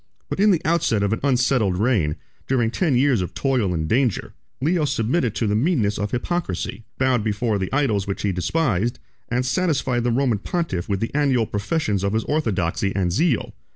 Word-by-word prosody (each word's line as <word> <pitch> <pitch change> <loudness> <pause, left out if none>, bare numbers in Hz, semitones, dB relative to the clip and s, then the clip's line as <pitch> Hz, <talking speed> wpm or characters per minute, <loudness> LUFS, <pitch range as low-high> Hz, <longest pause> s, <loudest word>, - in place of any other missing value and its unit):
But - - -3
in 210 +2 +5
the 180 -5 +2
outset 155 -10 +2
of 100 +1 +1
an 115 - -2
unsettled 125 -7 +2
reign, 100 -9 +1 0.3
during 120 -4 +1
ten 155 -1 +1
years 130 -4 +3
of 90 - -5
toil 130 -9 +1
and 80 -3 -1
danger, 120 - 0 0.3
Leo 160 +4 +1
submitted 125 -2 0
to 115 - 0
the 105 - +1
meanness 110 - +1
of 105 0 -1
hypocrisy, 120 - -3
bowed 130 -4 +2
before 105 0 0
the 95 - -3
idols 115 -9 +1
which 100 - -3
he 100 - +1
despised, 120 - 0 0.3
and 125 +1 0
satisfied 135 -5 0
the 120 - +1
Roman 120 -3 +1
pontiff 160 - -3
with 100 -1 -1
the 115 - -2
annual 135 -5 +2
professions 105 - -1
of 100 +1 0
his 110 - +1
orthodoxy 100 - -1
and 90 -3 +1
zeal. 155 - +1
120 Hz, 190 wpm, -22 LUFS, 100-140 Hz, 0.3 s, in